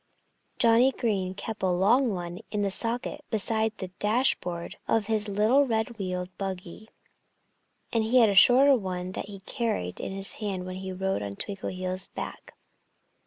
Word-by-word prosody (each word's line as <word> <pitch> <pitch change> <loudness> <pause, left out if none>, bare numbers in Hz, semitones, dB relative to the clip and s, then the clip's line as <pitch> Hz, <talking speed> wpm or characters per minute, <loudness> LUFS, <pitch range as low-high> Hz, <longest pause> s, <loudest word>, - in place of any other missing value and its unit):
Johnnie 235 +3 +5
Green 190 -6 -1
kept 220 +2 -6
a 190 - +1
long 215 +9 +3
one 175 -1 -5
in 210 -1 -1
the 200 - 0
socket 245 +8 -1
beside 220 0 +1
the 185 - -6
dashboard 210 -6 0
of 225 -2 +1
his 215 0 +2
little 220 +8 +3
red 225 0 -2
wheeled 185 -1 -4
buggy. 190 +2 -6 1.0
And 225 -1 +2
he 240 +3 +3
had 230 -3 +6
a - - +1
shorter 260 +7 +7
one 185 -4 -4
that 190 - -5
he 200 -2 -10
carried 190 - -3
in - - -4
his 195 0 -4
hand 195 -3 -3
when 185 0 -6
he 190 0 -6
rode 190 - -2
on 100 -1 -5
Twinkleheels' 185 - -3
back. - - -7
200 Hz, 165 wpm, -27 LUFS, 185-225 Hz, 1.0 s, shorter